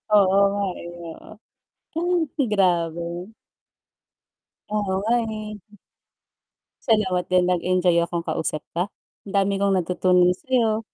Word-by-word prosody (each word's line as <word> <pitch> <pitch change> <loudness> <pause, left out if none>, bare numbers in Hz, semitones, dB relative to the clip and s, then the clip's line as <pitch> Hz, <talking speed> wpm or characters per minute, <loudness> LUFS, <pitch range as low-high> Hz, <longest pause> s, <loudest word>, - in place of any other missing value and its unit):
Oo 195 -1 +5
nga, 205 0 -1 0.2
eh, 170 - -8
oo. 170 +5 -11 1.0
Ay, 260 - +2
grabe. 175 -2 0 1.4
Oo 210 0 0 0.2
nga, 225 +4 +1
eh. 215 -1 -7 1.1
Salamat 190 -5 +2
din. 180 -1 +3
Nag-enjoy 180 -1 +2
akong 170 0 -2
kausap 160 -1 -2
ka, 175 +4 -1 0.4
ang 195 - -8
dami 195 0 +2
kong 200 -1 +2
natutunan 180 0 +3
sa 180 - -8
'yo. 220 -2 +2
185 Hz, 115 wpm, -23 LUFS, 175-210 Hz, 1.4 s, Oo